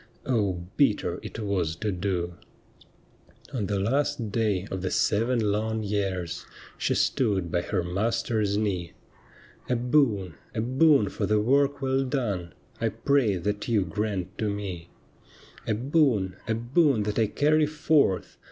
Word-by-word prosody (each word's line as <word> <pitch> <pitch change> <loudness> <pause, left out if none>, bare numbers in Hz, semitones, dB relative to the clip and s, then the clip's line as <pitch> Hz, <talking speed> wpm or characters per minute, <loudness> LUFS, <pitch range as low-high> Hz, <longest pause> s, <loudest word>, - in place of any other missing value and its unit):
Oh, 110 -7 +1 0.2
bitter 135 -8 +2
it - - -8
was 95 -7 -1
to 105 +5 -2
do! 90 -2 -2 1.2
On 110 -7 -1
the 100 - -1
last 130 +1 0
day 105 -4 0
of 95 - -3
the 95 - -1
seven 110 +1 +1
long 110 +1 -1
years 95 -4 -2 0.4
She - - +1
stood 100 -9 +1
by 85 - +1
her 90 0 -1
master's 105 +2 0
knee 95 -5 -2 0.3
— - - -26
' - - -26
A 125 - +2
boon, 120 - +2 0.2
a 110 - 0
boon 130 -2 +4
for - - -2
the 105 0 +3
work 140 +5 +2
well 135 0 +1
done, 105 - -2 0.2
I - - +1
pray 135 -8 +2
that 105 +4 -2
you 110 -5 +2
grant 100 0 -3
to 110 - 0
me; 95 -5 -5 0.4
' - - -22
A 110 - +1
boon, 120 - +2
a 110 - +1
boon 125 +1 +2
that 105 +2 -1
I 110 - +3
carry 150 +6 +2
fortli. 150 -9 +1
105 Hz, 155 wpm, -27 LUFS, 95-125 Hz, 1.2 s, boon